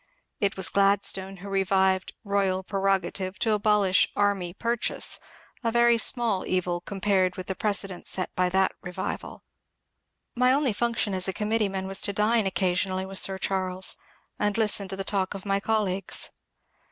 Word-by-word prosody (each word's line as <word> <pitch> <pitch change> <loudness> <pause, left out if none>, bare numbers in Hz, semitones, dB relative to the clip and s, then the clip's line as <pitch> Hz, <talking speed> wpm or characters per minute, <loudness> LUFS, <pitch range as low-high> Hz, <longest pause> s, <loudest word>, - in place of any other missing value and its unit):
It 200 -3 0
was 190 - +3
Gladstone 195 -1 +1
who 190 +3 -10
revived 190 -1 +1
" - - -54
royal 195 -2 0
prerogative" 195 -1 -1
to 220 +3 +1
abolish 205 -2 +3
"army 200 -4 +1
purchase," 235 +5 -1 0.2
— - - -29
a 230 - +1
very 235 0 +4
small 225 -5 +2
evil 180 -1 -1
compared 190 -1 0
with 185 - -5
the 190 - -3
precedent 195 -2 -2
set 185 - -1
by 180 0 +2
that 190 +1 +2
revival. 180 +1 -6 0.9
My 250 +1 +4
only 275 -4 +2
function 230 -2 -1
as 185 0 0
a 190 - -1
committeeman 210 -3 -1
was 195 +1 0
to 200 - -2
dine 210 +1 +2
occasionally 185 0 0
with 190 0 0
Sir 190 -1 +1
Charles 185 -1 -1 0.4
and 205 0 +1
listen 210 -3 0
to 190 - -2
the 195 - -3
talk 195 0 0
of 195 - -8
my 195 0 +1
colleagues. 200 -3 0
195 Hz, 165 wpm, -26 LUFS, 190-210 Hz, 0.9 s, very